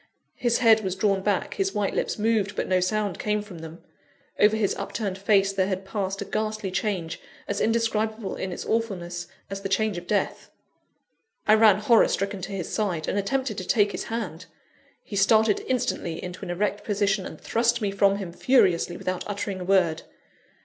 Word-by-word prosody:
His 240 -1 +2
head 225 -3 +5
was 190 -1 -2
drawn 195 -1 +1
back; 200 -1 0
his 195 +1 -1
white 205 -2 0
lips - - -1
moved, 210 -2 +1
but - - -2
no 185 -1 +3
sound 200 0 -1
came 210 0 0
from 190 -5 -10
them. 160 +1 -10 0.6
Over 210 +1 +5
his 205 -3 +1
upturned 200 -4 -3
face 195 -1 +3
there 190 -1 +1
had 190 0 -3
passed 195 0 -3
a - - -11
ghastly 215 -2 -2
change, 185 -4 -2 0.3
as - - -2
indescribable 225 -2 0
in 190 - -4
its - - -6
awfulness 180 -6 -2 0.2
as 195 0 -4
the 195 - -4
change 205 -1 +1
of 175 - -16
death. 205 -2 -1 1.0
I 215 - +7
ran 215 -3 +6
horror 230 +1 +5
stricken 195 0 -2
to 185 +2 -6
his 190 -4 -4
side, 180 -8 -1
and 205 - 0
attempted 235 +1 -1
to - - -5
take 205 -3 +3
his - - -4
hand. 185 -7 -5 0.6
He 205 - -8
started 215 +2 +4
instantly 230 -9 -1
into 180 0 -7
an - - -6
erect 205 +3 -1
position, 200 -2 0
and - - -10
thrust 235 +1 +1
me 205 -3 -1
from 200 0 +3
him 190 -4 -6
furiously, 175 -7 +3
without 185 -1 -3
uttering 200 -2 -3
a - - -4
word. 175 -4 +3
200 Hz, 190 wpm, -25 LUFS, 185-215 Hz, 1.0 s, I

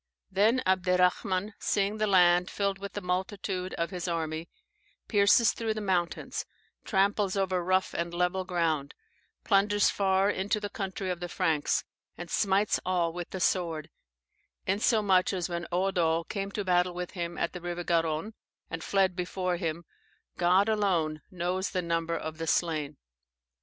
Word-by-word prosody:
"] - - -53
"Then 220 +7 +3
Abderrahman, 185 +1 +2
seeing 205 +1 0
the 215 - +2
land 180 -2 +5
filled 200 -1 -1
with 200 0 -7
the 205 - -4
multitude 185 0 -2
of 170 +2 -2
his 180 -1 -4
army, 165 -1 -3 0.6
pierces 210 +2 +5
through 225 -1 -2
the - - -3
mountains, 185 -4 -1 0.4
tramples 200 -1 +1
over 185 -2 0
rough 185 +1 +1
and 170 0 -2
level 180 +2 0
ground 165 -6 -1 0.5
plunders 205 0 +3
far 195 0 +2
into 205 +2 -1
the 205 -1 -5
country 190 -2 -3
of 180 - -4
the 175 0 -5
Franks, 160 -5 +1 0.3
and 175 -1 -8
smites 200 0 +2
all 175 -2 0
with 175 0 -6
the 190 - -5
sword, 165 -4 0 0.7
insomuch 200 -1 +3
that 185 -3 -1
when 170 -1 -4
Eudo 175 -3 +1
came 195 -2 -3
to 200 0 -4
battle 180 -1 +2
with 180 0 -4
him 170 -2 -4
at - - -1
the 180 - -7
river 175 0 -4
Garonne, 165 +4 0 0.4
and 165 -1 -4
fled 190 -2 +2
before 180 0 -2
him, 165 0 -3 0.5
God 180 +3 +3
alone 180 -8 +1
knows 185 +1 -2
the 185 -2 -2
number 165 0 -1
of 155 0 -6
the 165 - -3
slain. 155 -4 0
180 Hz, 155 wpm, -29 LUFS, 170-195 Hz, 0.7 s, land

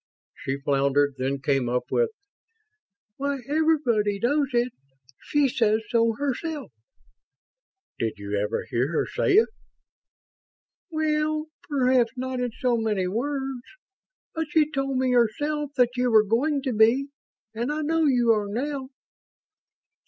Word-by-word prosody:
She 135 +1 -4
floundered, 140 0 +2
then 135 +1 -1
came 135 -3 +1
up 125 0 -2
with: 475 -1 +2 1.1
"Why, 280 0 -1
_every_body 280 -10 +1
knows 285 +3 +2
it. 240 0 +1 0.5
She 290 -1 +2
says 220 -3 +1
so 230 -1 +3
herself." 285 +4 -3 1.3
"Did 115 -1 -1
you 100 0 -4
ever 105 +1 -1
hear 125 +6 0
her - - +1
say 405 - 0
it?" 435 +4 +6 1.4
"Well, 310 -1 0 0.2
perhaps 255 -4 +2
not 255 0 -3
in 250 0 -1
so 245 0 0
many 215 -4 0
words. 265 +4 -2 0.7
But 320 -2 -2
she 305 0 +2
told 275 -2 -1
me 260 0 +1
herself 290 +6 +1
that 245 -1 +4
you 250 0 +1
were 215 -2 +5
going 270 +7 +1
to 260 -3 -1
be, 230 +6 +3 0.4
and 235 +5 -2
I 305 +1 -2
know 325 +1 +1
you 245 -4 +4
are 210 -2 +1
now." 265 +4 -3
250 Hz, 135 wpm, -25 LUFS, 215-290 Hz, 1.4 s, it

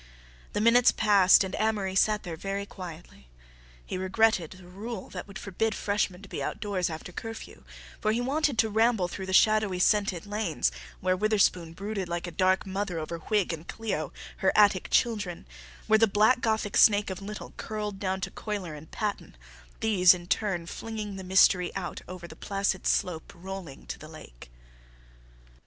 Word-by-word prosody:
The 205 - 0
minutes 240 +2 +6
passed 200 -2 +5
and 190 -1 -5
Amory 210 -3 0
sat 210 +2 +2
there 170 -3 -5
very 195 +4 -4
quietly. 175 - -10 0.6
He - - -4
regretted 190 -2 +2
the 185 -1 -15
rule 200 +3 -7
that 180 - -7
would 200 0 -9
forbid 215 +3 -2
freshmen 200 -2 -1
to - - -10
be - - -5
outdoors 195 -4 -2
after 160 +2 -7
curfew, 225 +4 -8 0.4
for 215 - +1
he 225 - 0
wanted 275 +1 0
to 220 +1 +3
ramble 220 -3 +3
through 190 +2 -6
the - - -3
shadowy 215 -1 +4
scented 200 -1 +2
lanes, 205 - -1 0.3
where 185 0 +2
Witherspoon 185 -5 +1
brooded 195 0 -4
like 170 0 -3
a 175 - -6
dark 185 +2 +2
mother 195 -2 -3
over 165 +1 -4
Whig 200 +1 0
and 165 +1 -8
Clio, 200 -10 -3 0.3
her 190 - +2
Attic 200 -3 +4
children, 205 -7 0 0.4
where 220 0 +4
the 225 - +5
black 215 +5 +3
Gothic 220 -2 0
snake 205 -2 +5
of 190 - -6
Little 210 +2 -7
curled 210 -2 -4
down 190 -1 -2
to - - -3
Cuyler 200 -7 -5
and 150 +1 -11
Patton, 210 - -4 0.4
these 185 -5 +6
in 175 -1 -9
turn 185 -2 -1
flinging 215 +1 -6
the 190 - -7
mystery 185 -1 +4
out 185 -3 -4
over 180 -1 -8
the 160 - -12
placid 195 +1 -1
slope 165 -3 0
rolling 185 -4 -8
to - - -6
the 155 - -10
lake. - - -13
195 Hz, 175 wpm, -28 LUFS, 180-215 Hz, 0.6 s, minutes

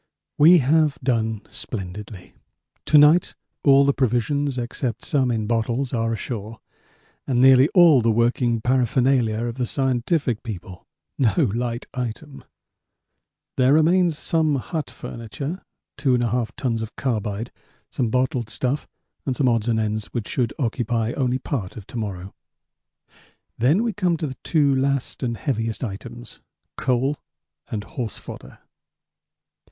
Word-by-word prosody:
We 165 +5 +8
have 150 +1 +3
done 110 -4 0
splendidly. 100 -2 -7 0.5
To 150 - +5
night 150 +4 +5 0.3
all 140 -1 +6
the 140 - +3
provisions 135 +2 0
except 120 -1 -3
some 135 -3 +1
in 110 -3 -1
bottles 120 +4 -1
are 115 -1 0
ashore 110 0 -5 0.7
and 125 -3 +1
nearly 130 +2 +7
all 165 -8 +7
the 115 - +2
working 115 0 +1
paraphernalia 125 -2 +2
of 120 +2 -5
the 125 - 0
scientific 130 - 0
people 95 -5 -8 0.3
no 130 - +2
light 120 +1 -3
item. 130 +3 -6 1.1
There 130 +1 +4
remains 165 +1 +3
some 155 -3 +1
hut 145 +3 -3
furniture, 135 - -6 0.4
2 135 -3 +2
1/2 120 -1 0
tons 120 -5 -1
of 110 0 -7
carbide, 110 -4 -2 0.4
some 120 -4 -1
bottled 125 -1 0
stuff, 130 +5 -2 0.4
and 130 - 0
some 135 - +1
odds 115 -1 +1
and 110 -1 +1
ends 110 0 -2
which 120 -4 -4
should 120 -4 -1
occupy 115 -3 -1
only 130 -2 0
part 125 -8 -4
of 105 - -9
to 120 - -9
morrow; 95 -3 -5 1.3
then 150 - +3
we 230 -2 -1
come 180 -5 0
to 160 - -3
the 130 -3 -6
two 145 -4 +3
last 135 0 -1
and 120 -3 -2
heaviest 115 -4 -2
items 120 +2 -7 0.3
coal 130 +3 0 0.5
and 105 -2 -3
horse 115 0 -5
fodder. - - -11
125 Hz, 135 wpm, -23 LUFS, 115-140 Hz, 1.3 s, We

